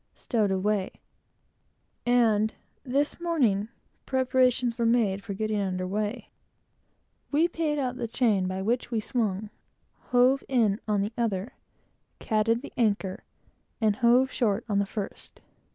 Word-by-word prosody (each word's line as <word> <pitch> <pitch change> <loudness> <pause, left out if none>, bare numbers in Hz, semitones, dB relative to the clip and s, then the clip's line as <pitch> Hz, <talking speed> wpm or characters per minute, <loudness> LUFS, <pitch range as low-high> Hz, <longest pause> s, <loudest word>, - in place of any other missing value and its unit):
stowed 220 -5 0
away; 190 +1 0 1.2
and, 220 -3 +3 0.3
this 280 +4 0
morning, 255 - +1 0.4
preparations 255 -2 +2
were 235 - -2
made 210 -5 +2
for 200 - -5
getting 215 0 -1
under 185 -2 -2
weigh. 210 +4 -3 1.0
We 310 +4 +3
paid 320 -3 -1
out 265 -3 0
on 250 - -8
the 235 - -3
chain 220 -5 +1
by 185 +1 -3
which 240 +4 0
we 230 -2 0
swung; 215 -2 -2 0.6
hove 255 +2 +4
in 225 -6 +2
on 210 -2 +1
the 205 +3 -3
other; 215 -1 -1 0.6
catted 225 +3 +1
the - - -9
anchor; 205 -5 0 0.6
and 215 -3 +2
hove 250 +2 +4
short 220 -3 0
on 205 -2 +1
the 200 - 0
first. 205 -1 -7
225 Hz, 135 wpm, -27 LUFS, 205-250 Hz, 1.2 s, hove